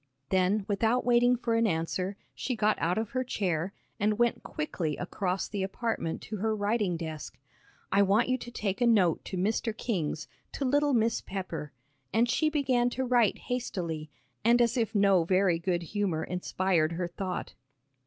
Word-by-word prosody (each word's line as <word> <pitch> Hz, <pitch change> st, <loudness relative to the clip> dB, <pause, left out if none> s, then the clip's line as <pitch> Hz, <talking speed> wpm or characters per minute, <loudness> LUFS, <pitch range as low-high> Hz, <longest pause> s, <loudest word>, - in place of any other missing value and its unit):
Then, 190 Hz, +2 st, +2 dB
without 225 Hz, +4 st, +1 dB
waiting 245 Hz, 0 st, +5 dB
for 235 Hz, -1 st, -1 dB
an 230 Hz, 0 st, +3 dB
answer, 180 Hz, +3 st, -1 dB, 0.2 s
she 255 Hz, -, -3 dB
got 215 Hz, -1 st, +2 dB
out 175 Hz, +4 st, +1 dB
of 220 Hz, -1 st, -2 dB
her 255 Hz, 0 st, 0 dB
chair, 185 Hz, -7 st, -1 dB, 0.3 s
and 210 Hz, +1 st, +2 dB
went 240 Hz, 0 st, +2 dB
quickly 180 Hz, -, -3 dB
across 185 Hz, +1 st, -2 dB
the 205 Hz, -2 st, -3 dB
apartment 195 Hz, -3 st, -2 dB
to 215 Hz, -, -5 dB
her 220 Hz, +2 st, 0 dB
writing 205 Hz, -3 st, 0 dB
desk. 160 Hz, -3 st, -6 dB, 0.5 s
"I 200 Hz, -, +4 dB
want 200 Hz, +3 st, +3 dB
you 255 Hz, -, +2 dB
to 240 Hz, -, -7 dB
take 210 Hz, -2 st, -3 dB
a 240 Hz, -, +4 dB
note 190 Hz, -8 st, +3 dB
to 190 Hz, -, -4 dB
Mr. 215 Hz, +3 st, 0 dB
King's, 165 Hz, -, -2 dB, 0.3 s
to 280 Hz, -, -2 dB
little 290 Hz, +1 st, +3 dB
Miss 230 Hz, 0 st, +2 dB
Pepper," 180 Hz, -6 st, -5 dB, 0.4 s
and 230 Hz, +2 st, +3 dB
she 310 Hz, +6 st, +2 dB
began 260 Hz, -5 st, +2 dB
to 260 Hz, +1 st, -2 dB
write 240 Hz, -4 st, +3 dB
hastily, 170 Hz, -11 st, -3 dB, 0.3 s
and 235 Hz, +2 st, +5 dB
as 235 Hz, -1 st, +3 dB
if 225 Hz, -2 st, 0 dB
no 195 Hz, -3 st, +5 dB
very 185 Hz, -1 st, +2 dB
good 175 Hz, 0 st, -1 dB
humor 180 Hz, -3 st, -1 dB
inspired 180 Hz, -2 st, 0 dB
her 175 Hz, +1 st, -2 dB
thought. 180 Hz, +1 st, -4 dB
205 Hz, 175 wpm, -29 LUFS, 180-235 Hz, 0.5 s, waiting